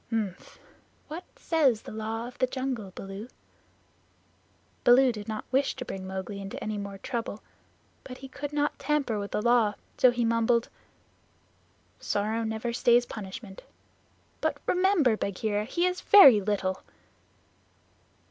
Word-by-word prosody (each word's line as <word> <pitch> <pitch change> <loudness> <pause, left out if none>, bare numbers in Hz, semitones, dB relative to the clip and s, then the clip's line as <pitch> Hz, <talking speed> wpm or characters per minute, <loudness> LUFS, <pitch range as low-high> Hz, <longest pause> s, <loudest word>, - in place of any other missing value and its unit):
"Mf! 210 -5 -3 0.5
What 330 +4 -7
says 275 -9 +1
the - - -9
Law 220 +2 -4
of 250 - -11
the 255 - +3
Jungle, 255 -7 -4
Baloo?" 195 +3 -7 1.6
Baloo 255 +1 +6
did 210 -3 -8
not 215 -1 -4
wish 270 +2 +1
to 250 - -6
bring 190 -3 -6
Mowgli 190 +1 -5
into 195 0 -7
any 215 -1 -3
more 200 -1 -6
trouble, 225 0 -5 0.6
but 255 -1 -9
he 270 - -9
could 280 +2 -6
not 295 0 -1
tamper 275 -7 0
with 200 0 -4
the 210 - -2
Law, 235 -3 +3 0.2
so 255 - +7
he 240 -1 0
mumbled: 230 +1 +2 1.3
"Sorrow 215 +3 -1
never 220 +2 -3
stays 240 0 +4
punishment. 195 -2 -8 0.8
But - - 0
remember, 360 - +3
Bagheera, 205 +1 -2
he 345 +9 0
is 365 0 -1
very 275 - +8
little." 190 -2 -1
230 Hz, 140 wpm, -28 LUFS, 205-260 Hz, 1.6 s, very